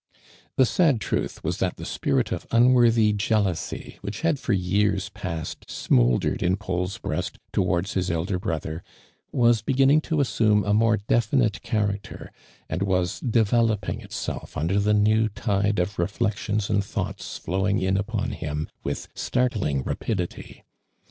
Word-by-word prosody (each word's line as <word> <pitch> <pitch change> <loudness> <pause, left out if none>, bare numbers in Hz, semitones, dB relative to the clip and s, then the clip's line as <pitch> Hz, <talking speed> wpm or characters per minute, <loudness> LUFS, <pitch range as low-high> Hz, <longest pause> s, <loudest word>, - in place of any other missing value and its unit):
The 130 - +5
sad 145 -3 +3
truth - - -3
was - - -1
that - - -1
the - - -7
spirit - - 0
of - - -4
un 120 +2 +5
worthy 115 -3 +4
jealousy, 100 -4 -1
which 100 - -5
had 165 -4 +1
for 125 - -2
years 95 +1 +1
past 85 -5 -6
smouldered - - +2
in 90 +1 +2
Paul's 95 -2 -3
breast - - -3 0.2
towards 95 +2 0
hj* 90 -1 0
elder 85 +3 -1
brother, 80 -3 -3 0.5
was 120 -2 +3
beginning 135 +5 +4
to 160 -1 -1
assume 110 -6 +3
a 105 - +1
more 110 +1 +4
definite 110 +1 +1
character, 105 -3 -3 0.4
and - - -3
was 90 -2 0
develop 115 -4 +2
ing - - -3
itself - - -6
under 85 +7 +1
the 105 +1 +2
new 110 +1 +3
tide 105 0 0
of 90 +2 -1
reflections 105 +2 -1
and 100 -1 +1
thoughts - - -4
flowing 95 +3 0
in 95 0 +1
upon 105 +2 -1
him, 75 0 -4
witli - - -3
startling 105 - 0
rapidity. 90 - -4
105 Hz, 150 wpm, -25 LUFS, 95-115 Hz, 0.5 s, The